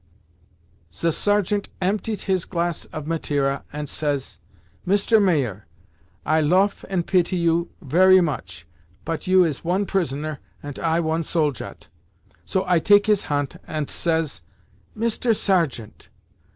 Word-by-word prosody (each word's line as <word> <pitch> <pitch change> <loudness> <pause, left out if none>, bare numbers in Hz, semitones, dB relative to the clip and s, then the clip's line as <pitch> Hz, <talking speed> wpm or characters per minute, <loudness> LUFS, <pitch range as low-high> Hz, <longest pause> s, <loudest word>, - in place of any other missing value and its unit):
"Ze 165 - 0
sergeant 205 +2 0
emptiet 205 +3 -1
his 190 -3 0
glass 170 -2 -2
of 155 -2 -7
Mateira, 145 -4 -1
ant 150 0 -5
says, 145 -2 -3 0.4
'Mister 205 +4 +3
Mayer, 140 - 0 0.6
I 155 +1 +3
loaf 185 +6 +2
and 180 -3 -1
pity 185 -1 +2
you 170 0 +1
very 185 +6 +6
much, 115 - -3 0.4
pot 165 0 -4
you 185 0 +6
is 155 -5 -2
one 185 +4 0
prisoner, 155 -6 -2 0.2
ant 145 -1 -7
I 165 0 +1
one 160 0 0
soldat.' 150 -5 -2 0.6
So 190 - 0
I 180 -2 +3
take 205 +5 +5
his 210 -2 +2
hant 145 -2 -2
ant 155 -2 -3
says, 160 - -1 0.5
'Mister 230 +1 +1
Sergeant! 165 - -1
170 Hz, 130 wpm, -23 LUFS, 150-190 Hz, 0.6 s, very